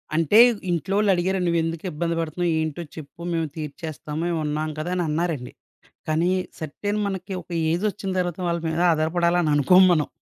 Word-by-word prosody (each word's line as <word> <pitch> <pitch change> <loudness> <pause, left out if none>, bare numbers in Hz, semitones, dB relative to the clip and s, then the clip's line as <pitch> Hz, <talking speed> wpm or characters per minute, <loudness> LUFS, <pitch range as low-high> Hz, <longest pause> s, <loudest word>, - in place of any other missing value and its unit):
అంటే 165 +6 +3 0.3
ఇంట్లోవోళ్ళు 195 +5 +1
అడిగారండి 185 +1 0
"నువ్వెందుకు 165 0 -1
ఇబ్బంది 165 +2 -2
బడుతున్నావు? 165 +2 -1
ఏంటో 160 +2 -3
చెప్పు 155 0 -11
మేము 165 -1 0
తీర్చేస్తాము. 155 0 -6
మేమున్నాం 155 -2 -1
కదా" 175 +4 -3
అని 175 - 0
అన్నారండి. 155 -5 -2 0.6
కానీ 165 +3 +2 0.3
సర్టెన్ 205 +7 -3
మనకి 190 0 -5
ఒక 175 - -22 0.2
ఏజొచ్చిన 195 +2 -1
తర్వాత 175 -1 -2
వాళ్ళ 170 0 0
మీద 160 +1 -1
ఆధారపడాలని 170 +1 +1
అనుకోం 180 +7 +6
మనం. 155 -4 +2
170 Hz, 145 wpm, -24 LUFS, 155-180 Hz, 0.6 s, అనుకోం